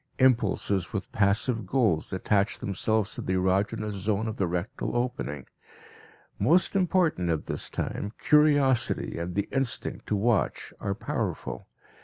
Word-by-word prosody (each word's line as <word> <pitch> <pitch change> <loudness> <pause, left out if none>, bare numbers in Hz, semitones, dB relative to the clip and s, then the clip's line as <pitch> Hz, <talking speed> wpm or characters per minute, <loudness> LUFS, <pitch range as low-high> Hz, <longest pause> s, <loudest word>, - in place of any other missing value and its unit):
Impulses 110 -7 +2
with 100 -2 -4
passive 105 +2 +1
goals 110 -10 +1
attach 100 +2 +1
themselves 105 +2 -1
to - - -5
the 95 - -2
erogenous 100 +4 0
zone 100 +2 -1
of 110 - -4
the 95 - +1
rectal 90 +9 -3
opening. 120 - -3 0.9
Most 165 - +3
important 180 - +2
at 80 -2 -1
this - - -5
time, 100 - -3
curiosity 145 - +3
and 85 +1 -4
the 100 - 0
instinct 135 -3 -1
to 105 - +1
watch 110 +1 0
are 100 - -1
powerful. - - -4
105 Hz, 135 wpm, -27 LUFS, 95-125 Hz, 0.9 s, Most